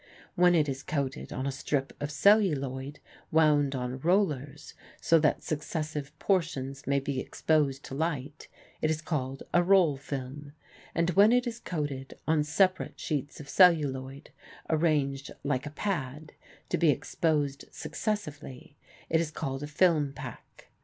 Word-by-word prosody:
When 175 0 +5
it 155 -3 +3
is 135 -1 -3
coated 140 -3 -3
on 130 - -3
a 140 - 0
strip 135 +1 -2
of 145 - -2
celluloid 145 -6 +2 0.3
wound 150 -3 +3
on 125 0 -3
rollers 150 -5 0 0.3
so 165 -1 +4
that 150 -1 +1
successive 150 -1 -4
portions 140 -8 -1
may 140 0 +2
be 135 -1 -3
exposed 140 -2 0
to - - -8
light, 150 -1 -3 0.3
it 155 - +2
is 160 -1 0
called 135 -4 -3
a 175 - +5
roll 175 -5 +4
film, 140 +1 -6 0.4
and 170 +1 +2
when 200 +5 +6
it 250 +1 +3
is 235 -1 -4
coated 145 - -4
on 155 -1 +3
separate 185 +5 +1
sheets 145 -2 -3
of 145 - -9
celluloid, 140 -6 +3 0.4
arranged 150 -4 +1
like 140 -1 -1
a - - -4
pad, 150 -4 -4 0.4
to - - 0
be 170 - +4
exposed 145 0 0
successively, 150 - -5 0.3
it 160 0 +2
is 165 - -2
called 135 -3 -4
a 145 - -4
film 150 -3 +2
pack. 130 -4 -10
150 Hz, 145 wpm, -29 LUFS, 135-165 Hz, 0.4 s, when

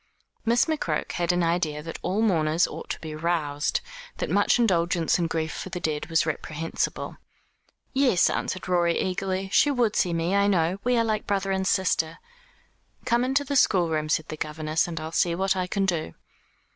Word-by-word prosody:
Miss 235 +1 +3
McCroke 295 - -2
had 175 0 0
an 175 0 +1
idea 165 -3 0
that 165 0 -7
all 205 +4 0
mourners 165 -5 +2
ought - - -8
to - - -3
be 155 -1 -6
roused; 155 -3 -1 0.4
that - - -3
much - - +3
indulgence 175 -7 +2
in 170 - +1
grief 160 -1 -2
for - - -6
the 180 -1 -4
dead 155 -3 -2
was 165 -1 +2
reprehensible. 160 0 -3 0.8
"Yes," 265 -9 +4
answered 185 - -2
Rorie 175 -2 +2
eagerly, 190 0 -2
"she 290 - +5
would 245 -6 +1
see 180 - +2
me, 170 +3 0
I 200 0 +3
know. 180 -1 +1
We 245 0 +2
are 230 - +3
like 215 -1 -1
brother 195 -1 0
and 190 0 0
sister." 165 -4 +1 0.9
"Come 240 0 +2
into 270 +3 +1
the 280 0 -3
schoolroom," 165 - +2
said 155 +1 0
the 155 - -5
governess, 155 +1 -1
"and 165 -1 -4
I'll 160 +1 -6
see 170 0 +1
what 190 +1 +1
I 185 -1 -1
can 195 +1 0
do." 165 - -2
175 Hz, 185 wpm, -26 LUFS, 160-195 Hz, 0.9 s, she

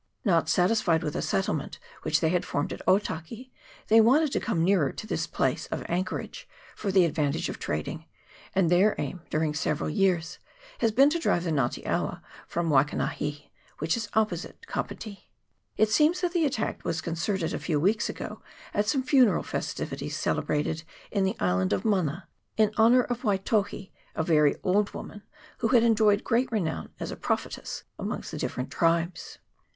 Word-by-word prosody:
Not 170 -5 +3
satisfied 180 -3 +2
with 150 -2 -3
a - - -1
settlement 160 -6 -1 0.2
which 155 -1 +1
they 160 - +3
had 180 +1 +1
formed 145 - -2
at - - -8
Otaki, 205 +5 0 0.4
they 225 +1 +7
wanted 275 +6 +4
to - - +1
coine 175 -9 0
nearer 180 -6 +3
to - - -8
this - - -2
place - - -1
of - - -4
anchorage, 185 +2 -3 0.3
for 200 - -2
the 190 -2 +5
ad 165 - -1
vantage 145 -3 0
of - - -6
trading, 75 - -4 0.5
and 180 -3 +3
their 190 +4 +4
aim, 180 - -4
during 155 0 0
several 150 0 -1
years, 180 -2 +1 0.4
has 230 - +2
been 275 +6 +5
to 340 - 0
drive 175 - +1
the 170 - -1
Nga 135 -6 +2
te - - -8
awa - - -2 0.2
from 170 -1 -1
Wai 135 -2 +6
kanahi, 150 0 -4 0.3
which 160 +2 0
is 225 -3 -4
opposite 215 - -1
Kapiti. 215 - -6 0.5
It 215 0 +3
seems 310 +8 +3
that 355 -1 0
the 340 -3 +2
attack 235 -5 -3
was 160 - -1
concerted 165 +2 -2
a - - -2
few 155 -4 0
weeks 210 +8 +2
ago - - -6 0.3
at 205 +1 +1
some 260 +4 +1
funeral 255 - +4
festivities - - -4
celebrated 155 +2 -1 0.3
in 200 -2 +1
the 190 - 0
island 95 0 +1
of - - -1
Mana, 180 -5 0 0.3
in 215 -1 +4
honour 235 +3 +5
of 245 0 -3
Waitohi, 200 -2 0 0.2
a 160 - 0
very 150 -3 +4
old 200 +2 +1
woman, 205 - -8 0.4
who 230 - +1
had 235 -1 +5
enjoyed 215 -3 +4
great 245 +2 +1
renown 180 -8 -2
as - - -4
a - - -5
prophetess - - -3 0.2
amongst - - -4
the - - -5
different 125 - -3
tribes. 170 +1 0
190 Hz, 180 wpm, -27 LUFS, 160-220 Hz, 0.5 s, they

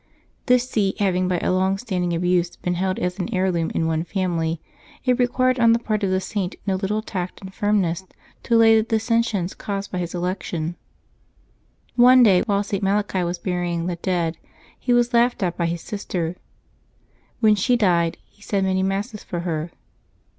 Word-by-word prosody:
This 250 0 +4
see 200 -6 0
having 185 -2 +1
by 180 -1 +1
a - - +1
long 190 +1 +1
standing 185 -5 -2
abuse 175 0 +1
been 180 - -2
held 185 +1 -1
as 180 +2 -2
an 190 +5 -3
heirloom 185 -4 0
in 165 - +1
one 160 0 0
family, 170 -3 -1 0.5
it 250 -1 +2
required 255 +1 +2
on 230 -1 +6
the - - +4
part 215 -3 -2
of 195 - +1
the 185 0 +1
Saint 190 -1 -3
no 195 - +1
little 200 +3 -1
tact 185 -5 -5
and 190 -1 -10
firmness 195 -5 0 0.4
to 235 - +1
allay 225 -1 +6
the - - +4
dissensions 225 -4 0
caused 200 -1 -5
by 180 - -2
his 175 0 -4
election. 175 -2 -3 1.2
One 250 +1 +7
day, 190 -5 +5
while 200 -1 +1
St. 200 -1 -3
Malachi 195 -1 0
was 175 +1 -2
burying 175 -2 -2
the 180 -1 -2
dead, 170 -2 -1 0.4
he 250 - -1
was 240 0 +3
laughed 235 -2 +3
at 175 -2 -1
by 170 - 0
his 170 0 -3
sister. 180 -5 -4 1.0
When 220 -2 +5
she 210 +5 +2
died, 170 -6 +2
he 205 - -30
said 200 -2 -1
many 190 0 +1
Masses 200 +3 -2
for 175 -2 -4
her. 165 -2 -3
190 Hz, 185 wpm, -22 LUFS, 175-215 Hz, 1.2 s, One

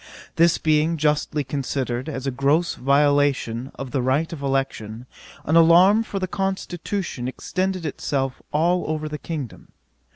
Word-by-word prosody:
This 170 0 +4
being 155 +1 +2
justly 150 0 0
considered 130 -1 -3
as 135 -3 -5
a 135 - 0
gross 140 +6 +1
violation 140 -3 +1
of 135 -2 -7
the 135 - 0
right 140 +7 0
of 150 - -7
election, 135 -5 -2 0.4
an 160 - +1
alarm 175 +6 +6
for 215 -3 -5
the 185 -1 -2
constitution 190 -6 -3
extended 185 +6 -3
itself 135 -3 -2
all 175 +4 +2
over 155 -1 -2
the 150 0 -6
kingdom. 150 -8 -6
150 Hz, 140 wpm, -23 LUFS, 135-170 Hz, 0.4 s, alarm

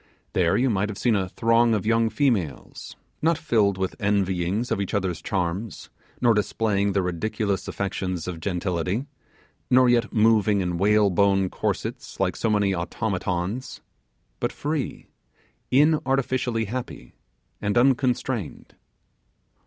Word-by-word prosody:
There 85 -2 +2
you 125 0 +2
might 105 0 0
have 100 - -6
seen 120 0 +2
a 95 -2 -1
throng 115 +1 +3
of 105 - -2
young 115 0 +2
females, 110 - -2 0.3
not 165 0 +2
filled 110 -11 +1
with 95 0 -2
envyings 100 +1 0
of 100 - 0
each 100 - -3
other's 95 -5 -1
charms, 95 +3 -3 0.3
nor 120 -2 +4
displaying 105 -1 0
the 95 -1 +1
ridiculous 100 +3 -2
affectations 95 -3 -3
of 90 -3 -5
gentility, 90 +5 -2 0.6
nor 130 0 +5
yet 120 -1 +2
moving 110 -2 +3
in 90 -2 -2
whalebone 100 -2 +3
corsets, - - -4
like - - +1
so 115 - -1
many 100 -2 +2
automatons, 95 +5 -3 0.6
but - - -1
free, 150 -2 -3 0.7
inartificially 130 -5 +2
happy, 125 +4 -6 0.5
and 105 +2 0
unconstrained. 125 - 0
105 Hz, 125 wpm, -24 LUFS, 95-120 Hz, 0.7 s, nor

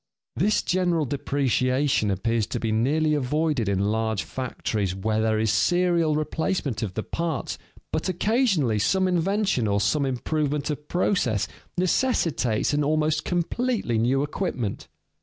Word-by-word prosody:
This 205 +8 +2
general 175 -4 +1
depreciation 130 -3 +1
appears 110 +3 0
to 120 - -3
be 115 -1 -1
nearly 150 +8 +2
avoided 145 -4 0
in 100 - +1
large 110 -2 -1
factories 110 -7 -3
where 110 +3 0
there 110 -1 +1
is 110 -1 +1
serial 175 -2 +2
replacement 155 - -1
of 100 -5 -4
the 110 - -2
parts, 165 -4 -3 0.3
but 160 +4 -1
occasionally 185 - +1
some 190 - +2
invention 185 - +1
or 100 0 +1
some 140 +8 +1
improvement 150 +3 -1
of 150 0 -6
process 150 - +1 0.3
necessitates 165 - +1
an 145 0 +2
almost 155 +1 +1
completely 180 - -1
new 130 +5 +2
equipment. 145 - -3
145 Hz, 135 wpm, -25 LUFS, 115-170 Hz, 0.3 s, This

